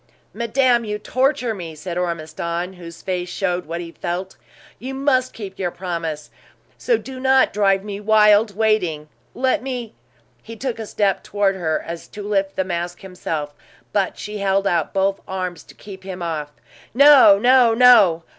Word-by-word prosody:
"Madame, 240 +1 +2
you 210 -1 -3
torture 255 +2 0
me!" 170 -6 -8
said 170 +3 -6
Ormiston, 170 +1 -3
whose 170 -2 -12
face 180 -1 -3
showed 180 -2 -2
what 170 +1 -4
he 170 -1 -8
felt. 180 +3 -5 0.4
"You 265 +3 -6
must 265 -2 +1
keep 200 -4 -9
your 180 -2 -1
promise; 170 -4 -5 0.4
so 475 - +1
do 260 -7 -9
not 265 0 +3
drive 195 -1 +2
me 205 -1 -6
wild 210 0 +4
waiting. 180 -9 0 0.3
Let 260 +1 +1
me 250 -4 -5 0.3
" 120 +1 -38
He 230 - -10
took 245 0 -4
a 220 - -6
step 200 -2 0
toward 200 -1 0
her, 160 -4 -1
as 170 0 -7
if - - -35
to 205 - -7
lift 195 -1 -1
the 190 - 0
mask 175 -1 -4
himself, 160 -6 -5 0.4
but 200 -2 0
she 210 0 -6
held 195 0 +1
out 170 -5 0
both 195 0 0
arms 185 -3 -4
to - - -16
keep 195 -2 -11
him 185 -2 -6
off. 155 -3 -4 0.4
"No, 275 -7 +8
no, 245 +1 +4
no! 210 -9 +6
195 Hz, 175 wpm, -21 LUFS, 175-225 Hz, 0.4 s, No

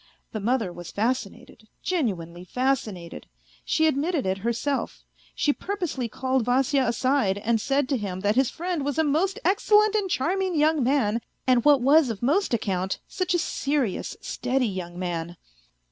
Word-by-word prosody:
The 215 - -4
mother 220 -3 0
was 175 -1 -9
fascinated, 220 -1 -3 0.2
genuinely 180 - -2
fascinated; 210 - -2 0.4
she 315 - +2
admitted 310 - +1
it 190 +1 -1
herself; 235 +6 -2 0.3
she 290 - +2
purposely 345 - -3
called 260 +1 0
Vasya 260 +2 +2
aside, 240 -4 +1
and 225 +2 0
said 275 +2 +1
to 275 - +1
him 190 -4 -4
that 205 +2 +1
his 265 -1 +3
friend 345 -3 -3
was 285 +1 -2
a 320 - +3
most 335 +7 +1
excellent 420 +1 +4
and 410 -3 0
charming 365 +4 0
young 305 -1 +3
man, 235 -4 +1 0.2
and, 250 -2 +3
what 290 -3 +5
was 280 +2 +5
of 225 0 -5
most 330 +11 +2
account, 190 -5 -1
such 365 -1 -1
a - - +4
serious, 280 - -1
steady 260 0 -1
young 180 -3 -5
man. 175 -1 -4
260 Hz, 160 wpm, -25 LUFS, 205-300 Hz, 0.4 s, what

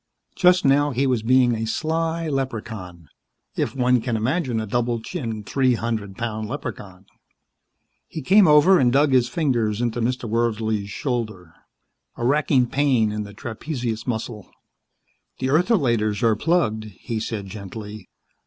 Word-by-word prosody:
Just 180 -2 +4
now 145 +2 +4
he 135 0 0
was 125 -4 +1
being 125 +1 +4
a 115 0 -2
sly 165 +5 -1
leprechaun, 110 - -5 0.5
if - - -2
one 125 -2 +2
can 115 -1 -1
imagine 125 +1 -1
a 110 - -3
double 120 +2 -1
chinned, 115 - -5
three 130 0 +2
hundred 110 -4 -4
pound 110 -2 -4
leprechaun. 100 -8 -7 1.0
He 155 - -7
came 195 +4 +6
over 155 +5 +6
and 125 -2 +3
dug 140 +2 +3
his 125 -2 +3
fingers 120 -9 0
into 120 0 -1
Mr. 125 +1 -1
Wordsley's 110 -2 -1
shoulder. 110 - -4 0.6
A 120 - -3
wracking 135 -1 +3
pain 125 -5 +1
in 105 0 -3
the 100 - -11
trapezius 120 -1 -5
muscle. 110 -4 -4 0.9
"The 130 - -2
ertholaters 125 - +2
are 115 -2 +4
plugged," 110 -6 0
he 110 +3 -6
said 110 -2 -4
gently. 105 +1 -9
120 Hz, 145 wpm, -23 LUFS, 110-135 Hz, 1.0 s, came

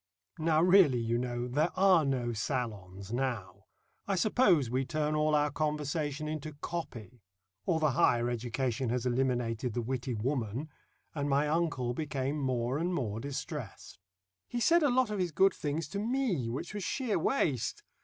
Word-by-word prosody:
Now 160 0 +3
really, 180 -8 +6
you 115 0 0
know, 120 0 -2
there 150 +7 +1
are 185 -4 +5
no 125 -4 -1
salons 105 -5 -4
now 120 -8 -3 0.4
I 200 - +1
suppose 185 - +3
we 130 +3 0
turn 155 +2 -1
all 150 0 +2
our 150 0 +2
conversation 150 0 -2
into 155 0 -4
"copy" 125 -7 -6 0.5
or 170 -4 +2
the 155 -2 +2
higher 120 -1 +3
education 120 +1 -2
has 125 +1 -1
eliminated 125 -2 0
the 120 - 0
witty 125 0 -3
woman 125 +3 -2 0.4
and 145 -2 -2
my 140 +2 +2
uncle 150 -6 0
became 140 0 -2
more 130 0 0
and 175 +2 0
more 110 -7 -2
distressed. 135 - -6 0.5
He 240 - -3
said 335 +8 +4
a 295 - +4
lot 250 -3 +2
of 210 - -2
his 180 -2 0
good 190 +4 +4
things 150 +2 -3
to 200 - -3
me, 220 - 0
which 130 - -5
was 205 -2 -4
sheer 235 0 -1
waste. 155 - 0
140 Hz, 165 wpm, -31 LUFS, 120-160 Hz, 0.5 s, really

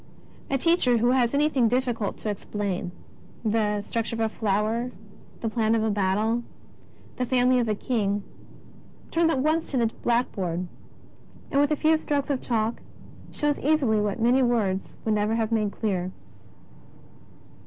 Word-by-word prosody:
A 275 - +2
teacher 265 -5 +3
who 240 +2 +3
has 250 -2 +3
anything 280 -4 +2
difficult 240 -4 -1
to 215 - -4
explain 200 -3 -3 0.3
— - - -23
the 210 -1 +1
structure 230 +2 -3
of - - -5
a 225 -1 +1
flower, 220 +3 0 0.5
the 230 - -1
plan 225 0 +1
of 220 - +1
a 220 - +1
battle, 210 +4 +1 0.8
the 250 - 0
family 250 0 +3
of 235 -2 0
a 215 - +1
king 205 -4 -1 0.4
— - - -24
turns 330 0 +3
at 270 -5 +1
once 315 +3 +1
to 270 - -1
the 235 - +3 0.2
blackboard, 190 -8 0 0.9
and 280 - +3
with 290 - +3
a 305 - +2
few 315 +2 +3
strokes 290 -2 -1
of 265 - -1
chalk 225 -1 -1 0.5
shows 295 -1 0
easily 270 -8 +2
what 210 +1 -1
many 245 +3 +4
words 215 -6 0
would 220 - +2
never 210 +1 +1
have 225 -1 -1
made 215 -3 +1
clear. 185 -5 -2
230 Hz, 165 wpm, -26 LUFS, 210-255 Hz, 0.9 s, many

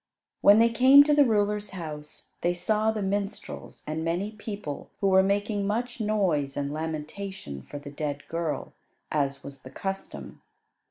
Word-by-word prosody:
When 205 +1 +8
they 230 +1 +6
came 260 +5 +8
to 295 +1 +2
the 290 0 +6
ruler's 210 -2 +1
house 150 -3 -8
they 175 +1 +1
saw 215 +4 +1
the 220 -2 -1
minstrels 200 +1 -4
and 155 +1 -3
many 175 +5 -1
people 205 -8 -6
who 195 - +2
were 190 0 +6
making 200 +1 0
much 240 +4 -2
noise 185 -10 0
and 140 0 -2
lamentation 155 - -5
for 145 - -9
the 145 0 -9
dead 145 -1 -4
girl, 165 -2 -3 0.4
as 140 -2 -1
was 140 -1 -10
the 130 - -11
custom. 195 +7 -6
195 Hz, 160 wpm, -27 LUFS, 150-210 Hz, 0.4 s, When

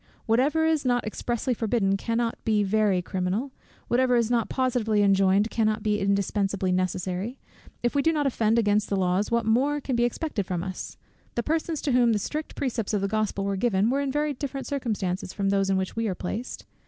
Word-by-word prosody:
"Whatever 280 +8 +2
is 320 -2 +2
not 245 -2 +1
expressly 240 +3 -2
forbidden 215 -4 +1
cannot 230 +3 -2
be 215 -2 +2
very 200 -2 +2
criminal; 190 +10 -2 0.4
whatever 250 +1 +3
is 235 -1 +2
not 235 -2 +1
positively 235 -5 +1
enjoined, 195 +2 +3
cannot 215 -2 0
be 210 -1 +1
indispensably 200 -1 0
necessary 185 +5 -2 0.5
If 240 - +1
we 285 - +2
do 325 - +3
not 300 -3 0
offend 230 -4 +2
against 210 -2 +2
the 200 - 0
laws, 185 +2 +1
what 235 -1 +1
more 270 +7 +2
can 265 -2 -2
be 235 - +2
expected 240 - -2
from 175 -2 -2
us? 185 -1 -6 0.4
The 235 - 0
persons 320 +1 -1
to 285 - 0
whom 245 -2 +4
the - - +2
strict 300 +9 -4
precepts 230 -5 -2
of 200 - 0
the 200 - 0
Gospel 215 -1 -1
were 200 0 0
given, 205 +1 +2
were 275 +2 +1
in 275 -1 -1
very 295 +1 0
different 275 0 -5
circumstances 205 -10 -2
from 195 -1 -1
those 195 -1 +1
in 190 - +2
which 190 0 -3
we 225 0 -1
are 190 - -2
placed. 220 +8 -5
220 Hz, 205 wpm, -26 LUFS, 195-250 Hz, 0.5 s, whom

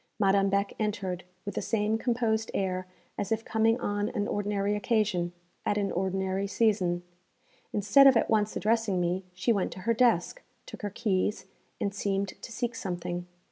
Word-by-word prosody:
Madame 195 -1 +4
Beck 200 +1 +1
entered, 200 -4 -2 0.2
with 205 - -4
the - - -2
same 215 -1 +1
composed 230 -2 0
air 185 -1 -1 0.3
as 205 +1 -2
if 225 0 0
coming 225 +2 +2
on 205 -1 -1
an 205 -4 -2
ordinary 205 0 0
occasion, 205 -5 +1 0.3
at 205 - 0
an 200 -1 0
ordinary 190 +1 -1
season. 195 -5 +1 0.7
Instead 210 +7 +6
of 260 -3 +7
at - - +2
once 215 -1 +1
addressing 220 -3 +1
me, 180 +2 0
she 190 +6 +1
went 200 -3 0
to 185 - -8
her 230 +4 +2
desk, 235 - +2 0.2
took - - -10
her 205 - -2
keys, 205 -1 -1 0.3
and 200 - -1
seemed 200 -1 -1
to - - -10
seek 240 +1 -2
something. 175 -3 -4
205 Hz, 170 wpm, -29 LUFS, 190-220 Hz, 0.7 s, of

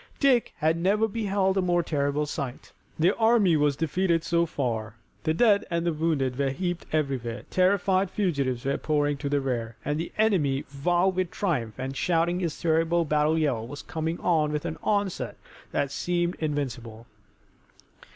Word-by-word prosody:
Dick 260 -4 +3
had 160 +2 +1
never 200 +6 +2
beheld 200 -3 0
a - - +2
more 175 -1 +2
terrible 145 -1 0
sight. 140 -4 -5 0.3
Their 175 +5 +3
army 220 -6 +5
was 145 -2 +2
defeated 165 +2 0
so 170 0 +1
far, 115 -7 -3 0.3
the 155 - +2
dead 205 -1 +4
and 170 -1 -1
the 170 - +1
wounded 145 -5 0
were 140 -1 +2
heaped 175 +5 -3
everywhere, 135 -6 -2
terrified 190 0 +2
fugitives 140 - -1
were 140 0 0
pouring 145 -1 +1
to 140 - -3
the 145 0 +2
rear, 120 -4 -3
and 150 +1 -1
the 170 - -4
enemy, 170 -11 +2 0.2
wild 180 +2 +2
with 185 -2 0
triumph, 135 - -2
and 130 +1 -4
shouting 175 +2 +1
his 170 -5 -3
terrible 165 +1 +2
battle 150 +1 +2
yell, 130 -8 0
was 145 +3 -8
coming 160 +1 -3
on 155 -4 +2
with 150 +1 -2
an 160 -1 -4
onset 200 -3 -1 0.3
that 140 -1 -1
seemed 175 +3 0
invincible. 120 -7 -4
160 Hz, 165 wpm, -26 LUFS, 140-180 Hz, 0.3 s, army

